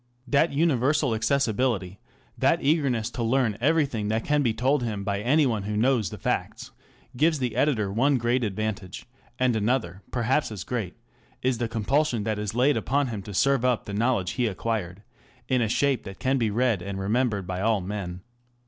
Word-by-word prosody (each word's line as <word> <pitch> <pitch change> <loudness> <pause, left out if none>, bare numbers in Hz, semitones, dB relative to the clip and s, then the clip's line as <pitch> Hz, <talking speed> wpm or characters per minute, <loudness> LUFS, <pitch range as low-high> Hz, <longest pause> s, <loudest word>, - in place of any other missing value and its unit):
That 140 +6 +3
universal 140 -3 +2
accessibility, 115 -5 0 0.4
that - - +2
eagerness 135 -6 +1
to 120 - -5
learn 115 -2 +1
everything 140 -7 +1
that 110 +1 -1
can 150 0 +2
be 120 -5 +2
told 130 +5 +1
him 110 -4 -3
by 100 0 -2
any 145 +7 +3
one 115 -5 0
who 105 +1 -3
knows 115 -4 +2
the - - -8
facts, - - -3 0.4
gives 155 +4 +3
the 125 -5 -2
editor 120 -7 +1
one 135 +5 +3
great 120 +1 +1
advantage; 105 -2 -4 0.3
and 125 -2 +2
another, 105 -4 -1
perhaps 125 +3 0
as 100 -5 -5
great, 110 -8 -4 0.5
is 130 -2 +1
the 120 - 0
compulsion 115 +2 0
that 110 -1 -2
is 105 0 -4
laid 130 +4 +3
upon 140 -1 0
him 110 -4 -4
to 100 +1 -9
serve 135 +2 +2
up 125 -2 +1
the 100 - -6
knowledge 110 -4 +1
he 125 -2 0
acquired 100 -2 -3 0.4
in 130 -2 +2
a 110 - +1
shape 135 +1 +1
that 95 -1 -8
can 135 +1 0
be 115 -2 +1
read 115 -2 +1
and 95 +1 -5
remembered 105 0 0
by 90 +1 -4
all 110 0 +2
men. 90 -2 -5
115 Hz, 185 wpm, -26 LUFS, 105-130 Hz, 0.5 s, That